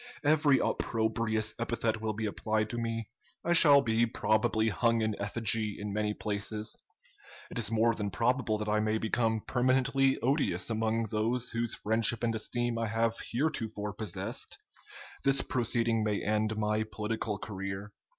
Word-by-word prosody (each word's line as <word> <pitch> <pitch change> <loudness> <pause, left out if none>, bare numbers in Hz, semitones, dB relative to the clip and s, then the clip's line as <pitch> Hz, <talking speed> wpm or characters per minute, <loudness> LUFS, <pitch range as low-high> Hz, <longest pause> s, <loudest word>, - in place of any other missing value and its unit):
Every 145 -2 +4
opprobrious 110 -1 0
epithet 115 -1 -1
will 110 -1 -1
be 110 +1 -3
applied 110 +1 -1
to 120 - -3
me. 115 -2 -3 0.4
I 170 - +3
shall 145 -4 +7
be 115 0 +2
probably 110 0 +1
hung 115 +1 +1
in 110 -1 0
effigy 105 0 0
in 105 -1 -5
many 105 0 -1
places. 105 +1 -2 0.8
It - - -3
is 105 -3 +1
more 115 +1 +3
than 105 -2 -3
probable 115 +2 +1
that 105 0 -4
I 105 0 +2
may 110 0 +1
become 110 0 0
permanently 135 +2 +2
odious 120 - +1
among 110 0 0
those 115 +3 0
whose 115 0 -1
friendship 110 +1 +1
and 115 -1 +1
esteem 120 +1 -1
I 115 - -1
have 115 +1 +1 0.2
heretofore 110 -6 -2
possessed. 105 -3 -4 0.7
This 135 0 +4
proceeding 115 -2 0
may 105 -1 -1
end 110 +1 0
my 105 0 0
political 110 0 -3
career. 95 0 -6
110 Hz, 150 wpm, -30 LUFS, 105-115 Hz, 0.8 s, shall